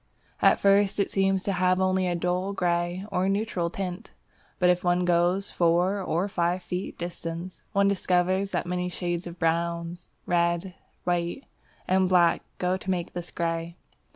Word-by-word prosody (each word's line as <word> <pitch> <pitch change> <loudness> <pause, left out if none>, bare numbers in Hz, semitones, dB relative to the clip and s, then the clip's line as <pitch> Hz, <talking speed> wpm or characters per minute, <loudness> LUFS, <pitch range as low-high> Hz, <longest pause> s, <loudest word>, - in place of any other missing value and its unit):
At - - +5
first 200 0 +3
it 200 - +1
seems 195 -1 +2
to 200 - 0
have 185 0 +2
only 185 0 +2
a 175 - 0
dull 180 +3 -1
grey 175 0 -1
or 185 +1 +1
neutral 195 -4 -1
tint. 185 +2 -5 0.5
But 180 -1 +4
if 180 0 -1
one 175 0 +2
goes 175 +3 +2
to - - -14
four 175 +4 +2
or 180 +1 0
five 175 -1 -1
feet 180 +2 -4
distance, 170 +1 -6
one 200 0 +4
discovers 185 0 +1
that - - -2
many 180 0 -2
shades 175 -1 -3
of 170 0 -8
brown, 170 +1 -1 0.3
red, 170 +1 +1 0.3
white, 175 +7 -1 0.4
and 185 0 +3
black 175 -2 +4 0.2
go 180 +1 0
to 190 - -8
make 180 -2 -2
this 175 -1 -5
grey. 165 0 -3
180 Hz, 165 wpm, -27 LUFS, 170-190 Hz, 0.5 s, At